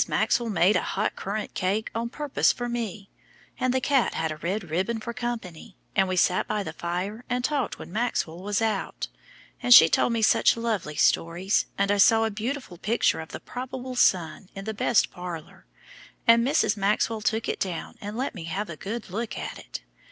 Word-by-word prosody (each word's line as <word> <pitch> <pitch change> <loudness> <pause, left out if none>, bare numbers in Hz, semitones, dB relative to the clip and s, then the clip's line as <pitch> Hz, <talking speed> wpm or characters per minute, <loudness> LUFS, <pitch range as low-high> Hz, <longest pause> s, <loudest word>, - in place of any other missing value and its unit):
Maxwell 235 -1 +1
made 195 +1 +3
a - - +3
hot 205 +2 -1
currant 205 +2 -4
cake 200 +4 -1
on 230 +1 -2
purpose 295 +2 +1
for 245 - -4
me, 225 -4 -4 0.5
and 255 - +1
the 260 - +2
cat 270 -1 +2
had 160 -1 -1
a 155 - -5
red 190 +6 -2
ribbon 190 +7 0
for 235 +2 -5
company, 220 -7 -5 0.2
and 195 -1 +3
we 185 - -1
sat 180 0 +2
by 210 -1 -1
the 160 - -6
fire 180 +7 -4
and 245 0 -1
talked 275 -3 -1
when - - -10
Maxwell 215 -7 -1
was 205 +3 -1
out, 215 -3 -2 0.5
and 245 0 +8
she 160 - +10
told 165 - +2
me 225 -1 0
such 215 - +4
lovely 215 -10 -2
stories, 175 +7 +2
and 200 0 +2
I 205 - +2
saw 225 +2 +6
a 220 - -1
beautiful 220 -3 -4
picture 230 +4 +1
of 160 - -7
the - - -7
probable 255 0 -6
son 180 -4 +2
in 195 0 -7
the 220 - -3
best 215 +1 +2
parlor, 175 -4 -8 0.6
and 230 0 +6
Mrs. 270 -5 +2
Maxwell 210 +2 +1
took 220 +2 0
it - - -2
down 180 -4 -4
and 210 +2 -6
let 265 +3 -2
me 175 -6 -7
have 190 +3 -3
a - - -6
good 210 +4 -6
look 225 +3 -3
at - - -5
it. - - -8
210 Hz, 200 wpm, -26 LUFS, 185-235 Hz, 0.6 s, she